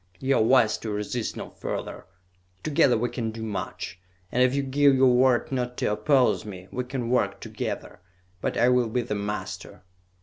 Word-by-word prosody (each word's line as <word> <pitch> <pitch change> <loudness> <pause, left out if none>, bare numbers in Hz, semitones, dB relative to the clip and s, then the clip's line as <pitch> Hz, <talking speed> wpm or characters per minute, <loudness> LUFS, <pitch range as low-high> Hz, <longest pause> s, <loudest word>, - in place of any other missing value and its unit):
"You 135 0 +2
are - - +3
wise 115 -2 +4
to 110 - -5
resist 105 +3 -3
no - - -7
further! - - -6 0.6
Together 140 -5 +3
we 120 +2 0
can 115 -2 -3
do 110 0 -6
much, 95 -4 -5 0.3
and 125 - +1
if 130 +1 +4
you 140 - +1
give 140 +1 +4
your 130 -1 +5
word 125 0 +3
not 125 -2 -2
to - - 0
oppose 130 +4 +2
me, 95 -3 -9
we 125 0 -3
can 125 -2 -3
work 125 - +1
together; - - -5 0.4
but - - -2
I 120 - +4
will 125 -2 +3
be 120 +2 0
the 105 - -3
master!" 105 -2 -5
125 Hz, 190 wpm, -26 LUFS, 110-130 Hz, 0.6 s, your